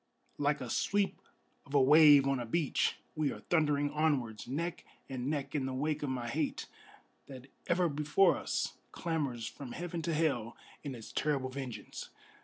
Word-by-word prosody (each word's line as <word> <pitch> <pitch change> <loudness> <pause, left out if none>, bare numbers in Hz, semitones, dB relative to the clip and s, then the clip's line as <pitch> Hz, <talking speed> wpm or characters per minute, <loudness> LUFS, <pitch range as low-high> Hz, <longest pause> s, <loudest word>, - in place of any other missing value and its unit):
Like 145 -1 +1
a 125 - -5
sweep 200 -1 0 0.4
of 140 - -7
a - - +7
wave 145 0 +7
on 135 -1 +1
a 120 - -3
beach 155 +4 +1 0.2
we 155 -2 +1
are - - -7
thundering 145 -3 +1
onwards, 145 -9 0
Neck 170 +7 -3 0.2
and 130 -1 -3
neck 140 -2 -2
in 140 -3 0
the 130 - -3
wake 150 +3 -1
of 145 - -2
my 125 -2 -3
hate, 115 - -2 0.6
that 130 0 -11 0.2
ever 175 0 +3
before 150 +5 +3
us - - -2 0.2
Clamors 140 -9 -2
from 125 +2 -7
heaven 175 -1 -4
to 165 +1 -1
hell 140 -8 0 0.3
in 140 -3 -5
its 115 -2 -10
terrible 140 -3 0
vengeance! 130 -3 -7
145 Hz, 170 wpm, -32 LUFS, 130-155 Hz, 0.6 s, a